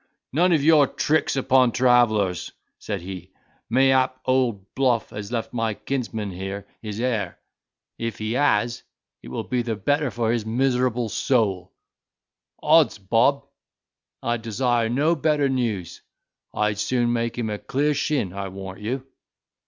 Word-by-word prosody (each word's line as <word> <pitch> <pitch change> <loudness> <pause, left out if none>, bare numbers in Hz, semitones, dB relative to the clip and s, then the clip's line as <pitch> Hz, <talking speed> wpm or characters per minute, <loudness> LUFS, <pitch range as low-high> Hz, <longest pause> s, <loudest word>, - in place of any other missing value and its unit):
"None 175 +5 +3
of 155 -4 +3
your 150 -2 +6
tricks 155 +3 0
upon 130 -2 +3
travellers," 115 -7 +2 0.3
said 100 -4 -4
he; 90 -1 -8 0.4
"mayhap 130 +1 +3
old 120 -7 0
Bluff 125 -4 +1
has 105 +1 -7
left 115 -2 -3
my 115 -3 -1
kinsman 115 -6 -3
here 95 +2 -6 0.2
his 105 -1 -6
heir: 115 -7 -1 0.6
if 115 -1 -3
he 110 0 -3
has, 120 -2 +1 0.4
it - - -12
will - - -4
be 125 -1 -1
the 115 -2 -2
better 145 +7 0
for 115 -2 -1
his 115 -2 0
miserable 125 +1 +1
soul. 100 -6 0 0.9
Odds - - +5
bob! 115 +8 +2 0.8
I'd 120 -1 -1
desire 115 0 0
no 145 +7 +2
better 150 -2 +2
news. 115 -9 -2 0.5
I'd 105 -1 0
soon 120 +2 +1
make 115 0 -2
him 110 -3 -2
a 105 - -4
clear 145 +3 0
shin, 145 - -1
I 100 0 -4
warrant 95 +1 -8
you." 130 +4 -3
120 Hz, 145 wpm, -24 LUFS, 105-130 Hz, 0.9 s, your